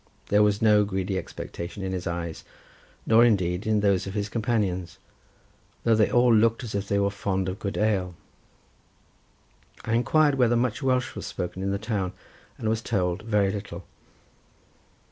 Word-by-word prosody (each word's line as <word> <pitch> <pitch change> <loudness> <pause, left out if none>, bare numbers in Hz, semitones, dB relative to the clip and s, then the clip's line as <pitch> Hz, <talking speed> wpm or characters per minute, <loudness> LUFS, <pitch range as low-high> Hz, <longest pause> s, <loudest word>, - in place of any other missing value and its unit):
There 105 +1 +4
was 105 0 +2
no 105 -1 +5
greedy 95 -1 -2
expectation 95 +3 -7
in 95 - -3
his 90 -2 -4
eyes, 85 -2 -4 0.6
nor, 115 +1 +6
indeed, 95 -4 +1
in 110 -1 +2
those 100 -2 +1
of 95 - -6
his 105 -1 -2
companions, 100 -6 -1 0.9
though 115 - +3
they 110 -1 +3
all 120 -1 +4
looked 115 +2 +3
as 115 - -6
if 100 0 -2
they 100 - +1
were 100 0 +1
fond 95 -2 -2
of 95 +2 -4
good 100 0 -4
ale. 95 -5 0 1.7
I 110 - -1
inquired 145 +4 +3
whether 120 -1 +4
much 120 +1 0
Welsh 130 -2 0
was - - -6
spoken 90 0 -5
in 95 - -1
the 100 - 0
town, 100 -3 -3 0.4
and 110 - -4
was 110 0 0
told 95 -5 -1
very 105 -3 +1
little. 100 -3 -6
100 Hz, 165 wpm, -26 LUFS, 95-115 Hz, 1.7 s, nor